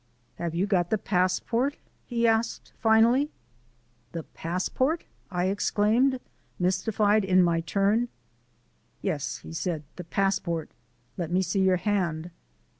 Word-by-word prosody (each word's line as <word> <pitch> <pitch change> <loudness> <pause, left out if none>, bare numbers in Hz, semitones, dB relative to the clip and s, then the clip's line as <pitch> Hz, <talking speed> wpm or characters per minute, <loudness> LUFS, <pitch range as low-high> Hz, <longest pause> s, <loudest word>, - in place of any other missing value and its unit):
"Have 170 -1 -3
you 180 +3 +2
got 180 -4 +1
the 220 - +2
passport?" 210 +8 +1 0.3
he 235 -1 0
asked 225 0 0
finally. 230 +6 +4 0.8
"The 165 -1 -4
passport!" 225 - -1 0.3
I 180 -2 0
exclaimed, 215 +6 +2 0.4
mystified 205 +3 +2
in 185 -1 +4
my 170 -1 +2
turn. 200 +7 +1 1.0
"Yes," - - -2
said 160 - -2
he, - - -25
"the 180 - -5
passport. 170 -3 -1 0.5
Let 170 -4 -2
me 185 +2 +2
see 185 +2 0
your 190 -1 +4
hand." 175 -4 -1
195 Hz, 120 wpm, -27 LUFS, 175-220 Hz, 1.0 s, finally